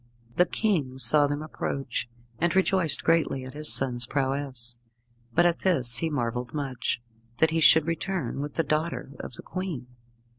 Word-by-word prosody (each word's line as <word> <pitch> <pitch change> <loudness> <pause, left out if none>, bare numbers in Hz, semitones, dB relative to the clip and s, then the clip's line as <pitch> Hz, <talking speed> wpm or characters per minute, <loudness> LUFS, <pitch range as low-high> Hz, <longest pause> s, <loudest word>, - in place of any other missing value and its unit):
The 180 - +4
King 155 - 0
saw 145 +2 +3
them 145 +1 -3
approach, 135 -5 -4 0.3
and 175 +2 +1
rejoiced 185 -4 +2
greatly 160 -5 +1
at 130 - -9
his 150 +1 +2
son's 120 -3 +2
prowess; 135 -3 -1 0.6
but 175 - +5
at 175 -1 +2
this 130 -11 +3
he 160 - -1
marvelled 125 -2 -3
much, 135 -4 -2 0.4
that 160 +4 +3
he 165 - +1
should 160 0 +7
return 165 -4 -2
with 145 0 -6
the 165 - +1
daughter 155 -1 -2
of - - -7
the - - -9
Queen. 185 -9 -5
145 Hz, 160 wpm, -27 LUFS, 130-165 Hz, 0.6 s, should